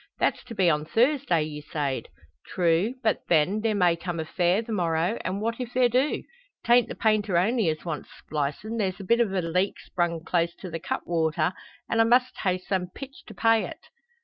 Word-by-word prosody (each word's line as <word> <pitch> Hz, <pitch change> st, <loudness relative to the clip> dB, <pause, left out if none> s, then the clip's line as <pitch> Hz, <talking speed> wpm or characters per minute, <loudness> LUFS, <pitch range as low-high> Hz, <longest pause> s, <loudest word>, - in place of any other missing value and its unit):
"That's -, -, 0 dB
to 235 Hz, -2 st, -9 dB
be 190 Hz, -3 st, +3 dB
on 150 Hz, -2 st, +2 dB
Thursday, 235 Hz, -, +2 dB
ye 150 Hz, -1 st, -6 dB
sayed?" 140 Hz, -5 st, -3 dB, 0.4 s
"True; 180 Hz, +7 st, +1 dB
but, 220 Hz, -, +2 dB
then, 175 Hz, +6 st, +3 dB
there 220 Hz, -1 st, +1 dB
may 180 Hz, -4 st, +3 dB
come 170 Hz, 0 st, -5 dB
a 160 Hz, -, -2 dB
fare 180 Hz, +5 st, +1 dB
the 230 Hz, -, -8 dB
morrow, 175 Hz, +1 st, 0 dB
an' 190 Hz, +2 st, -2 dB
what 230 Hz, +2 st, -2 dB
if 245 Hz, -1 st, -6 dB
there 250 Hz, -1 st, +4 dB
do? 260 Hz, +5 st, +1 dB, 0.4 s
'Tain't 240 Hz, 0 st, +5 dB
the -, -, -6 dB
painter 215 Hz, -4 st, +2 dB
only 215 Hz, +1 st, +2 dB
as 155 Hz, +1 st, -4 dB
wants 155 Hz, -3 st, -4 dB
splicin', 155 Hz, +10 st, -4 dB
there's 190 Hz, -3 st, -1 dB
a -, -, -6 dB
bit 235 Hz, +5 st, +3 dB
o' -, -, +5 dB
a 190 Hz, -3 st, -2 dB
leak 180 Hz, +4 st, 0 dB
sprung 170 Hz, -2 st, -2 dB
close 170 Hz, -1 st, 0 dB
to 185 Hz, -, -9 dB
the 165 Hz, -, -4 dB
cutwater, 160 Hz, +1 st, -1 dB, 0.3 s
an' 225 Hz, -, 0 dB
I 225 Hz, -, +6 dB
must 250 Hz, +2 st, +3 dB
hae 185 Hz, -2 st, +1 dB
some 185 Hz, 0 st, -2 dB
pitch 270 Hz, +9 st, -11 dB
to 215 Hz, -, -11 dB
pay 225 Hz, +3 st, +3 dB
it." -, -, -9 dB
185 Hz, 205 wpm, -26 LUFS, 165-225 Hz, 0.4 s, I